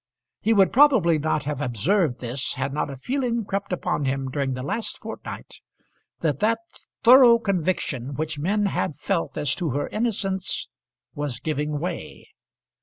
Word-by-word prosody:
He 220 - +1
would 195 -4 +4
probably 230 - +5
not 155 0 0
have 145 -1 -3
observed 145 - +1
this 125 +2 -3
had 135 +1 -2
not 150 0 -1
a 135 - -7
feeling 240 - -1
crept 195 0 -3
upon 170 -5 -1
him 135 0 -1
during 135 -1 -1
the 130 - -5
last 220 - -2
fortnight, - - -8 0.6
that 150 -4 0
that 225 +2 +2 0.5
thorough 245 -1 +8
conviction 175 - -1
which 155 0 -3
men 205 +7 +1
had 175 -6 -1
felt 165 +3 -2
as 145 -2 +2
to 175 -3 -2
her 145 +2 -1
innocence 195 -4 -2 0.5
was 145 -5 -3
giving 150 -1 -2
way. 175 +4 -5
160 Hz, 155 wpm, -24 LUFS, 140-205 Hz, 0.6 s, thorough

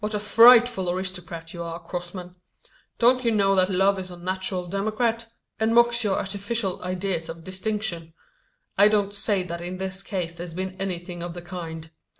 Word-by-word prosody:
"What 210 0 -1
a - - 0
frightful 230 -2 +6
aristocrat 180 -3 -5
you 170 - -6
are, 165 0 -5
Crossman! 180 +1 -7 0.6
Don't 250 +2 +4
you 235 - +3
know 200 -3 +3
that 185 -1 +3
love 195 +1 +2
is 185 -1 -5
a 175 - -9
natural 185 +1 -3
democrat; 220 +5 -1 0.3
and 220 +1 +2
mocks 235 0 +5
your 200 -3 +1
artificial 200 0 -2
ideas 180 -2 -2
of 165 0 -8
distinction. 185 -3 -3 0.6
I 205 - +8
don't 205 -1 +1
say 200 -1 0
that 170 -1 -6
in 180 +1 -5
this 190 0 -3
case 185 -4 -3
there's 170 -1 -8
been 185 0 -4
anything 175 -2 -4
of 175 0 -5
the 175 - -8
kind. 165 -3 -7
190 Hz, 175 wpm, -25 LUFS, 175-210 Hz, 0.6 s, I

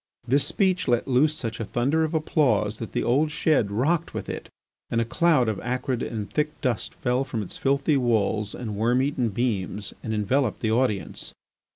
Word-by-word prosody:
This 135 +3 +3
speech 185 -3 +1
let 120 0 +2
loose 140 +4 +3
such 115 -4 -5
a - - -1
thunder 135 +9 +1
of 160 +1 -1
applause 115 -9 +1
that 115 - -6
the - - 0
old 145 +6 +2
shed 150 -7 +2
rocked 150 +11 0
with - - -4
it, - - -6 0.4
and 115 - 0
a 115 - +1
cloud 155 -2 +3
of 110 -3 -1
acrid 125 0 -2
and 105 -3 -3
thick 150 +9 -2
dust 125 -5 -1
fell 125 0 0
from 115 -5 -3
its - - -7
filthy 140 +2 +1
walls 110 -4 0
and 110 -4 -5
worm 120 +5 +2
eaten 135 -4 0
beams 105 -3 -2
and 110 - -4
enveloped 110 +3 0
the 110 - +1
audience. 110 -5 -1
125 Hz, 190 wpm, -25 LUFS, 110-145 Hz, 0.4 s, This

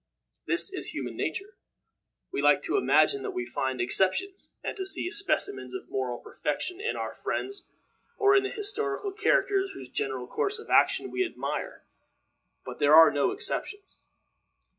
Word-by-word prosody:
This 355 +3 +1
is 375 - -2
human - - -4
nature. 395 +2 -4 0.7
We - - -1
like - - +4
to - - -1
imagine 410 0 +3
that 405 -2 -5
we 365 - -1
find 130 -1 -2
exceptions, 190 - 0
and - - -3
to 380 -1 -4
see 360 -2 -1
specimens 310 - 0
of - - -7
moral 125 -2 -2
perfection 365 - -4
in 465 - -1
our - - -4
friends 400 +1 -4 0.5
or 405 -1 +5
in 400 - +6
the 395 - -3
historical 410 -1 -2
characters 395 -1 +1
whose 130 -1 -10
general 130 -2 -2
course 405 - -1
of 440 - -10
action - - +3
we 375 - +1
admire; 360 - -4 0.8
but - - -8
there 145 +1 +6
are 165 0 +9
no 145 -1 +2
exceptions. 410 -2 -4
385 Hz, 160 wpm, -28 LUFS, -, 0.8 s, are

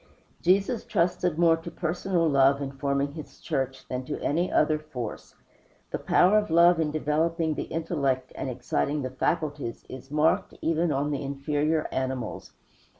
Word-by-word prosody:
Jesus 195 +5 +2
trusted 175 -1 0
more 165 -1 +5
to 165 +1 -8
personal 170 +1 -1
love, 140 -1 +4
in 140 -1 -4
forming 140 +1 -1
his 155 -1 -10
church, 135 0 -3
than 125 0 -3
to - - -4
any 170 +5 0
other 155 -1 +3
force. 130 -8 -7 0.6
The - - -2
power 200 +4 +4
of 210 - -4
love 170 +1 +5
in 160 -2 +1
developing 155 +2 0
the - - -4
intellect 140 -6 -1
and 135 - -4
exciting 130 +3 -1
the 130 - -3
faculties 145 -2 -2
is 130 +1 -9
marked, 150 +2 +1
even 165 0 +1
on 145 +2 0
the 140 - -2
inferior 145 +3 -1
animals. 130 -3 -3
150 Hz, 155 wpm, -27 LUFS, 135-165 Hz, 0.6 s, more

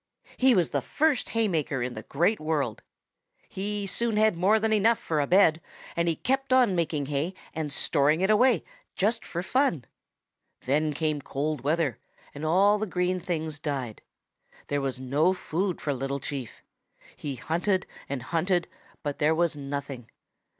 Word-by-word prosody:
He 260 -1 +4
was 175 -4 +2
the - - 0
first 305 -3 +1
hay 225 -1 +2
maker 150 -7 -1
in 125 0 -3
the - - -6
Great 175 +9 +1
World. 150 -8 -1 0.7
He 205 +1 -3
soon 220 +3 0
had 215 -2 +4
more 195 +6 +3
than 220 0 +1
enough 220 +2 +4
for 160 -9 -2
a 140 - -1
bed, 170 -4 +4 0.3
but 170 0 +1
he 165 - +2
kept 270 - -1
on 250 -6 +5
making 155 -4 0
hay 150 +6 -2 0.2
and 155 -2 -3
storing 150 +3 +2
it 190 +2 +3
away 235 -3 +4 0.3
just 225 +4 +1
for 175 +1 -4
fun. 190 - +1 0.8
Then 150 +4 +1
came 155 -1 -1
cold 145 +1 -3
weather 150 -4 0 0.3
and 145 - -8
all 195 +6 +4
the 215 - -2
green 180 0 0
things 160 -4 -3
died. 135 -7 -4 0.7
There 145 0 0
was 135 -2 -3
no 145 +8 +2
food 180 +1 -2
for 145 - -1
Little 135 +1 -3
Chief. 135 -4 -6 0.5
He 140 -2 -5
hunted 175 - 0 0.2
and 135 -3 -3
hunted, 175 +3 0 0.4
but 145 -2 -3
there 155 +2 +3
was 170 -1 +1
nothing. 140 -4 -6
165 Hz, 165 wpm, -27 LUFS, 145-200 Hz, 0.8 s, on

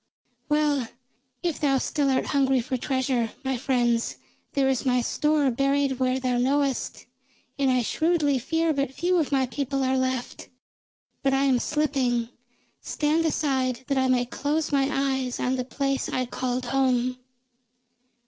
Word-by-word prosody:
"Well, 295 -4 +1 0.6
if 340 -3 -1
thou 275 -3 +2
still 280 +1 0
art 260 -1 +1
hungry 270 -2 +2
for 250 +2 -2
treasure, 255 -2 -1
my 265 -1 -1
friends, 240 -2 0 0.4
there 275 -1 +2
is 265 -2 +1
my 250 -2 +2
store 295 +2 +1
buried 275 +1 +1
where 255 0 +1
thou 250 -1 0
knowest, 275 +1 0 0.5
and 275 -1 +3
I 255 -1 +2
shrewdly 305 0 +1
fear 325 +5 0
but 275 -2 -1
few 360 +1 +1
of 305 - -1
my 265 -2 +2
people 275 +1 -2
are 260 0 +1
left. 260 -1 -2 0.7
But 270 0 +2
I 270 - +2
am 265 -3 +3
slipping. 260 -6 0 0.5
Stand 310 +2 0
aside, 260 -5 0
that 275 - +1
I 260 - +2
may 250 -1 +2
close 295 +5 -2
my 275 -1 +2
eyes 265 -2 -1
on 255 +1 0
the 255 - -2
place 275 +1 -1
I 255 - -1
called 250 +1 -3
home." 255 -1 +1
265 Hz, 155 wpm, -25 LUFS, 255-285 Hz, 0.7 s, and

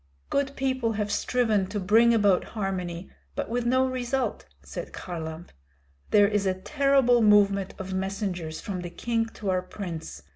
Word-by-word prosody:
"Good 280 0 0
people 260 -4 0
have 210 -1 -2
striven 215 -3 +1
to 205 +2 -3
bring 225 +5 +5
about 205 -5 +4
harmony, 185 -3 -3 0.2
but - - -3
with 240 +1 -1
no 260 +1 +3
result," 255 -2 -2 0.2
said 70 0 -7
Kharlamp. 160 -1 -6 0.6
"There 205 -1 +6
is 205 -1 0
a 185 - +1
terrible 270 +2 +3
movement 200 -2 +4
of 190 0 -5
messengers 190 -4 -3
from 190 -3 -4
the 175 - -5
king 230 +4 -1
to 200 -3 -2
our 185 0 +1
prince. 180 -3 -7
205 Hz, 155 wpm, -27 LUFS, 185-240 Hz, 0.6 s, There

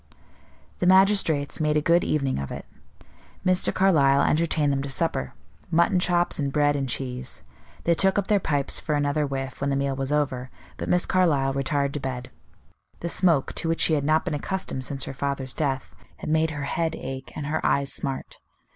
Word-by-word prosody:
The 175 - +1
magistrates 190 -6 +3
made 150 -1 +2
a - - +4
good 170 +3 +3
evening 140 - 0
of 70 - -4
it. - - -7 0.8
Mr. 185 0 +3
Carlyle 145 -8 +4
entertained 155 -2 +2
them 135 - -1
to 140 - -5
supper 135 - -1 0.3
mutton 170 +2 +3
chops 175 -2 +2
and 140 -2 -1
bread 145 0 +2
and 135 -2 -2
cheese. 125 0 -4 0.4
They 170 - +3
took 190 +3 +2
up 200 - +1
their 205 0 +2
pipes 145 -6 0
for 150 - -1
another 145 +1 0
whiff 135 -1 -5
when 140 - 0
the 140 - +1
meal 140 0 -1
was 135 +1 -3
over, 130 -4 -1 0.3
but - - -5
Miss 180 0 +3
Carlyle 145 -8 +2
retired 140 +1 0
to 145 - -3
bed; 130 -2 -5 0.7
the 170 - -2
smoke, 170 -6 +2
to 165 - -2
which 165 - 0
she 160 - +3
had 145 -2 +1
not 155 +3 +2
been 180 - -2
accustomed 150 -3 -3
since 135 -1 -2
her - - -5
father's 135 -1 -3
death, 135 -4 -2 0.2
had - - -5
made 160 0 +2
her 145 -2 -5
head 165 +3 -1
ache 135 0 -7
and 150 - -4
her 150 +2 -2
eyes 140 -1 +1
smart. 135 -1 -5
145 Hz, 195 wpm, -25 LUFS, 135-165 Hz, 0.8 s, a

